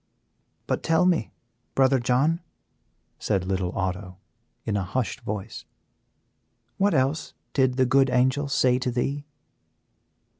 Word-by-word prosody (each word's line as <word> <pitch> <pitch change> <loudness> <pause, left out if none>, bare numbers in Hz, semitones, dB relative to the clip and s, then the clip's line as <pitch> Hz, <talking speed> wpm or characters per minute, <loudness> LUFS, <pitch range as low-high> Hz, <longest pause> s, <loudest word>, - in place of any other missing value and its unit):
"But - - -1
tell 165 +2 +3
me, 175 -10 +1 0.4
Brother 135 0 +4
John," 130 +7 +2 0.8
said 95 -4 0
little 95 -1 -1
Otto, 95 -1 -3 0.5
in 105 - -1
a 100 - +1
hushed 115 +6 -2
voice, 105 +1 -5 1.2
"what 200 +1 +3
else 135 +4 0 0.2
did 130 -2 +2
the 130 - +4
good 135 +1 +4
Angel 130 +3 +2
say 130 -2 +2
to 125 - -1
thee?" 135 +4 -2
130 Hz, 120 wpm, -25 LUFS, 105-140 Hz, 1.2 s, Brother